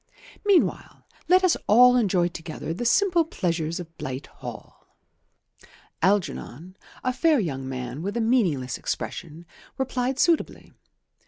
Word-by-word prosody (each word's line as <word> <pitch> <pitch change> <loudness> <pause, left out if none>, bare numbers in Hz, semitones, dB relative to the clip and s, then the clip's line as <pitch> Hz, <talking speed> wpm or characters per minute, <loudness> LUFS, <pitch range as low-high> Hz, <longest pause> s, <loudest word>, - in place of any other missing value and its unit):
Meanwhile 400 -4 +1 0.2
let 370 +1 +5
us 365 -3 +4
all 250 +3 +7
enjoy 190 -7 +2
together 165 -2 -6
the 215 +8 -4
simple 355 - +3
pleasures 170 - -2
of 165 -2 -9
Blight 130 +1 -5 0.2
Hall." - - -10 1.1
Algernon, 185 -3 -1 0.3
a 255 - 0
fair 315 +1 +3
young 135 -9 -3
man 125 +2 -5
with 200 +6 -3
a - - +1
meaningless 195 - +1
expression, 165 -1 -5 0.3
replied 260 0 -1
suitably. 335 0 0
190 Hz, 120 wpm, -25 LUFS, 160-255 Hz, 1.1 s, all